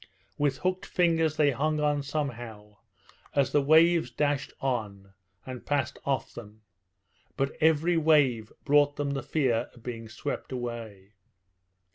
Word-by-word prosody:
With 145 -2 +1
hooked 185 0 -2
fingers 165 -3 +1
they 145 -2 +4
hung 150 +4 0
on 150 -1 +1
somehow, 120 -8 -5 0.6
as 135 -2 +2
the 145 - +3
waves 160 0 +4
dashed 145 +2 -1
on 100 -7 -3 0.3
and 130 -2 -7
passed 140 -2 -1
off 140 -1 -1
them; 110 -1 -11 0.7
but 135 0 -1
every 160 +2 +3
wave 140 -8 +3
brought 145 0 +4
them 145 -1 -2
the 135 -1 -2
fear 125 -7 0
of 120 - -17
being 115 -2 -6
swept 110 - -5
away. 115 -6 -6
140 Hz, 135 wpm, -28 LUFS, 120-150 Hz, 0.7 s, they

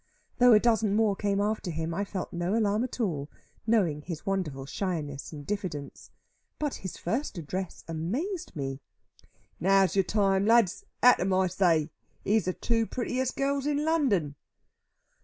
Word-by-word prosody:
Though 245 -1 +7
a 210 - +7
dozen 220 -3 +2
more 215 -2 +3
came 200 0 0
after 210 -2 -1
him, 160 0 -3
I 200 +4 -1
felt 195 -2 -5
no 175 +4 -1
alarm 215 0 +2
at 255 - -5
all, 155 -10 -1 0.4
knowing 185 -10 +2
his 165 0 -7
wonderful 160 -9 -2
shyness 150 -4 -4
and 145 -2 -8
diffidence. 180 -8 -5 0.5
But 295 -2 -2
his 190 - -6
first 230 - -2
address 180 +3 -5
amazed 235 - -3
me. 135 -2 -4 0.8
"Now's 195 0 +3
your 195 - +5
time, 195 0 +2
lads. 230 -5 +3 0.2
At 250 0 +7
'em, 190 +2 0
I 190 0 +3
say. 170 -4 +2 0.3
Here's 215 +2 +2
the 185 - 0
two 230 +2 0
prettiest 255 +1 -2
gals 280 0 0
in 295 0 0
London." 245 - +1
195 Hz, 160 wpm, -28 LUFS, 165-230 Hz, 0.8 s, Though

